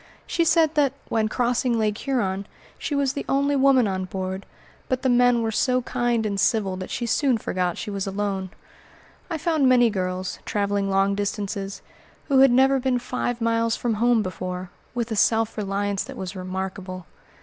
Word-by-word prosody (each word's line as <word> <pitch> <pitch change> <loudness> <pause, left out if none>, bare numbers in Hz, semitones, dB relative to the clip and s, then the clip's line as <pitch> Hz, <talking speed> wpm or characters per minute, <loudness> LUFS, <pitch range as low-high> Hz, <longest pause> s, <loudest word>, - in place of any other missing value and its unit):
She 335 - +1
said 325 -1 +4
that, 285 -4 +2 0.2
when 220 -1 +1
crossing 245 0 +1
Lake 215 -2 +1
Huron, 200 -7 -2 0.3
she 290 - -2
was 275 -2 +1
the 280 - -4
only 280 +1 +2
woman 265 -4 +4
on 185 -1 -2
board, 190 +1 -5 0.4
but 255 0 -1
the 260 - +2
men 245 -1 +4
were 225 - 0
so 255 +2 +1
kind 240 -2 0
and 200 -2 -1
civil 200 -2 +1
that 185 - -6
she 240 - -3
soon 255 +1 +2
forgot 180 -4 -2
she 210 - -5
was 195 -1 -3
alone. 195 -1 -2 0.8
I 330 - -2
found 310 -4 +2
many 245 -2 +5
girls, 185 -1 -3
traveling 200 -1 -1
long 195 +1 +2
distances, 200 -1 -3 0.5
who 270 -1 +5
had 270 -1 +7
never 265 +2 +4
been 255 -1 +1
five 245 -1 -3
miles 230 0 +1
from 240 -2 -1
home 230 +1 +3
before, 185 -1 -5 0.2
with 235 -1 -2
a - - 0
self 225 +1 +2
reliance 200 -1 -1
that - - -9
was 190 +1 -5
remarkable. 185 0 -5
220 Hz, 180 wpm, -24 LUFS, 195-255 Hz, 0.8 s, had